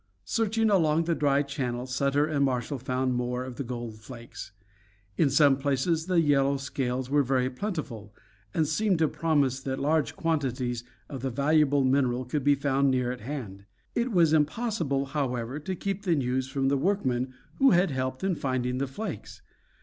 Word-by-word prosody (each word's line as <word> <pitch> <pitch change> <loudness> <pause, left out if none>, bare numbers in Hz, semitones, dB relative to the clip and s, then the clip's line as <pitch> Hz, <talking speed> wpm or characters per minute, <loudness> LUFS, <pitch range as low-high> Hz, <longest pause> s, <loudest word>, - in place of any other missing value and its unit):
Searching 225 0 +1
along 165 -4 +3
the 170 +1 0
dry 145 -2 +2
channel 125 -4 -3
Sutter 140 +3 +1
and 150 -2 0
Marshall 130 +1 -1
found 130 +1 -1
more 125 0 -2
of 130 -2 -8
the 140 - -2
gold 120 -3 -6
flakes. 115 -2 -10 0.6
In 145 - +3
some 140 0 +5
places 145 +4 0
the 180 -2 +3
yellow 140 -3 +3
scales 130 -1 -3
were 145 0 +4
very 130 -1 +1
plentiful, 135 - -5 0.4
and 160 - +1
seemed 210 +2 +1
to 160 -1 +3
promise 150 -4 +1
that 135 0 -3
large 150 +2 0
quantities 130 -7 -1 0.2
of 135 -4 -7
the 135 - -1
valuable 145 +2 +3
mineral 130 -1 +1
could 140 +3 -2
be 145 +1 +4
found 140 0 +1
near 125 -2 +1
at 125 - -7
hand. 110 -7 -6 0.3
It 240 +1 0
was 170 -5 +4
impossible, 155 - 0
however, 135 -2 -2
to 185 +5 -4
keep 195 +2 -3
the 180 -5 +1
news 130 -1 -1
from 135 0 0
the 140 - +2
workmen 130 -7 0 0.2
who 270 -1 +6
had 180 - +3
helped 130 +1 -3
in 190 -1 +1
finding 130 -4 -1
the 140 - -1
flakes. 130 - -7
140 Hz, 175 wpm, -27 LUFS, 125-155 Hz, 0.6 s, who